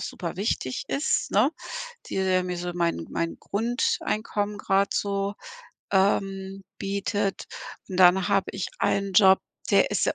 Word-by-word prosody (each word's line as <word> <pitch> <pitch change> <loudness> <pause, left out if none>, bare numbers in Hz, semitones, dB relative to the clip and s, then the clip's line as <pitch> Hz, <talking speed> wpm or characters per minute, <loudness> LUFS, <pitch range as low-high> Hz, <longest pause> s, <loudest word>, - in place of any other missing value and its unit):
superwichtig 175 - -3
ist, 285 +3 0
ne, - - +4 0.6
die - - -4 0.3
mir 180 -1 -3
so 175 0 -3
mein 170 - -1
mein 165 0 -2
Grundeinkommen 215 -2 -1
grad 200 -1 +1
so, 200 0 -1 0.6
ähm, 195 0 +1 0.2
bietet 200 0 -2 0.4
und 185 - -5
dann 185 +1 +6
habe 195 -1 +2
ich 195 - -3
einen 200 -1 0
Job, 190 -1 +6 0.3
der - - +5
ist - - +1
sehr - - +1
195 Hz, 130 wpm, -26 LUFS, 185-200 Hz, 0.6 s, dann